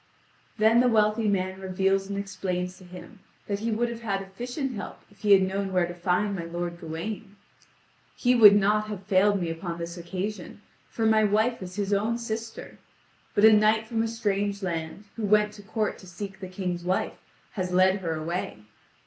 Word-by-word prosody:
Then 220 +2 +5
the 250 - +4
wealthy 215 -1 +2
man 190 -1 -1
reveals 195 +1 0
and 200 - -3
explains 185 -2 -3
to - - -14
him 180 +4 -12 0.3
that 200 -1 -2
he 225 +2 -2
would 230 +2 +1
have 235 -1 -6
had 195 -4 -2
efficient 245 +8 -5
help 205 - -7
if 200 - -22
he 205 0 +5
had 190 -1 +6
known 195 +1 -2
where 180 -2 +2
to 175 - -6
find 180 +3 0
my 170 - -4
lord 170 0 -4
Gawain. 175 +5 -6 0.8
"He 250 0 +2
would 210 -4 +9
not 210 +1 +2
have 205 -3 -6
failed 200 +1 +3
me 170 -2 -2
upon 170 +1 -5
this 170 +1 -6
occasion, 185 +3 -5 0.3
for 225 - -2
my 220 0 +4
wife 215 +3 +1
is 185 0 -7
his 205 0 -1
own 220 +4 +1
sister; 225 -1 -6 0.6
but 205 - +5
a 220 - +9
knight 215 +1 +4
from 225 0 -1
a 225 - 0
strange 205 -3 -1
land, 165 +1 -4
who 225 - -4
went 210 0 +3
to 210 - -12
court 215 +1 -2
to 185 - -13
seek 190 +2 -7
the 190 - -6
King's 180 -2 -4
wife, 185 +1 -1 0.3
has 185 -3 -3
led 185 +2 +4
her 165 -3 -2
away. 155 - -4
200 Hz, 195 wpm, -26 LUFS, 185-215 Hz, 0.8 s, would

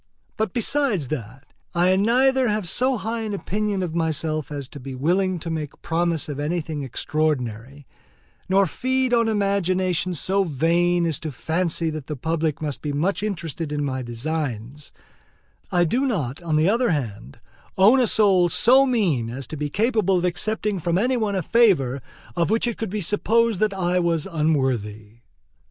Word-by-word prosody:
But 220 -3 -1
besides 235 - +1
that 130 0 -7 0.2
I 180 +2 +4
neither 255 +6 +3
have 210 -4 -1
so 255 +8 +1
high 225 +3 -3
an 215 -2 -3
opinion 205 0 -2
of 170 -3 -4
myself 155 -2 -1
as 140 -3 -5
to 145 - -9
be 135 0 -7
willing 180 +7 +1
to 165 - -4
make 155 -3 -5
promise 170 -1 0
of 145 -2 -5
anything 155 0 -2
extraordinary, 140 -2 -2 0.6
nor 195 +1 +4
feed 255 +6 -1
on 230 -1 +3
imaginations 185 -5 0
so 195 +1 +1
vain 170 +3 +1
as 160 -3 -2
to 155 - -5
fancy 165 +3 -1
that 155 -3 -7
the 150 - -4
public 160 +1 -2
must 140 -5 -4
be 150 - -3
much 170 +9 -1
interested 165 -6 -4
in 145 -1 -1
my 130 -2 -3
designs; 130 +1 -4 0.8
I 175 -1 +3
do 255 - +1
not, 155 - -2
on 165 -3 -1
the 155 +2 +3
other 235 +4 +2
hand, 105 - -4 0.4
own 210 +8 +6
a 245 - +3
soul 195 -5 +4
so 260 +10 +5
mean 175 - +1
as 130 +3 -6
to - - -7
be 150 0 -3
capable 210 - +1
of 180 - 0
accepting 205 +3 0
from 170 +1 0
any 250 +6 +1
one 215 -4 -1
a 185 - -1
favor 150 - +3 0.3
of 170 -1 +1
which 225 +3 +2
it 235 -2 -1
could 225 - -4
be 210 +2 -3
supposed 220 +3 +2
that 215 -1 +2
I 180 -2 0
was 170 -3 0
unworthy. 130 - -1
170 Hz, 175 wpm, -23 LUFS, 150-205 Hz, 0.8 s, own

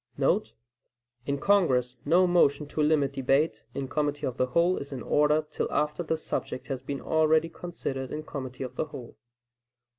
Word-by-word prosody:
* 120 - -47
[In 140 0 0
Congress 130 -11 +3
no 180 +2 +5
motion 150 -5 +3
to 155 - -2
limit 150 -2 +2
debate 135 +4 +1
in 135 -1 -3
committee 145 +1 -1
of 130 -1 -3
the 130 - +2
whole 170 +7 +2
is 140 - -7
in 130 -3 -5
order 150 +1 +3
till - - -2
after 150 +3 0
the 160 -1 -1
subject 130 -4 -4
has 135 -2 -3
been 135 +1 -5
already 160 +1 +3
considered 135 -7 -5
in 155 +1 -4
committee 130 -3 -6
of 125 - -7
the - - 0
whole. 125 -5 -10
145 Hz, 175 wpm, -28 LUFS, 130-155 Hz, -, no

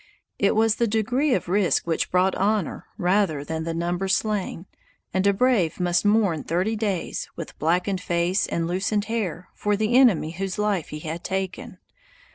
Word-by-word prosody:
It 200 - +3
was 220 0 +3
the 235 - +2
degree 245 +7 +1
of - - -3
risk 190 +1 +2
which 165 -1 -1
brought 185 +1 +2
honor, 205 -2 -1
rather 180 -5 +1
than 160 +2 -4
the 165 - -2
number 175 +3 -1
slain, 195 -3 -1 0.5
and 190 +1 +2
a - - +6
brave 200 -6 +1
must 175 +2 +1
mourn 205 -7 +2
thirty 185 +7 0
days, 205 -5 -2
with 165 - -8
blackened 180 +4 0
face 175 +3 0
and 165 - -1
loosened 195 +4 -1
hair, 200 -7 -3
for 210 0 0
the 220 +3 +1
enemy 225 -12 +5
whose 190 +2 -4
life 210 -5 0
he 150 - -7
had 165 +2 -5
taken. 190 -1 -4
190 Hz, 170 wpm, -24 LUFS, 170-210 Hz, 0.5 s, a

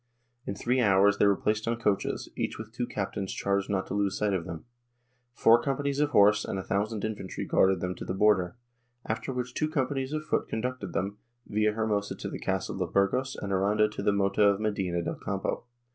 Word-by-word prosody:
In 100 - -2
three 125 +5 +1
hours 100 -1 +4
they 100 - +5
were 100 - +4
placed 105 +3 -1
in 115 - +1
coaches, 105 -4 -1
each - - -2
with 110 0 -8
two 120 +1 -3
captains 100 -1 -3
charged 100 0 -1
not 95 -2 0
to - - -6
lose 100 -1 0
sight 105 -1 +1
of 90 -3 -1
them. 85 -3 -7 0.7
Four 115 +1 +5
companies 140 +1 -1
of 150 0 +3
horse 105 -4 +5
and - - -3
a 95 - -3
thousand 105 +2 -1
infantry 105 -3 -4
guarded 95 -2 +3
them 90 0 -1
to - - -8
the 95 - -3
border, 95 -2 +3 0.5
after 110 +4 -3
which 125 -1 -4
two 155 +3 0
companies 135 -2 -1
of 155 0 -3
foot - - 0
conducted 125 +3 -3
them, 100 +2 -2 0.3
Villahermosa 105 -1 0
to - - -5
the - - -5
castle - - -2
of - - -2
Burgos 125 +7 +1
and 100 -1 -4
Aranda 105 +3 +3
to 105 - -6
the 105 - +3
Mota 100 +1 +1
of 100 -1 +5
Medina 95 -5 -1
del - - -4
Campo. - - -2
105 Hz, 205 wpm, -28 LUFS, 100-120 Hz, 0.7 s, they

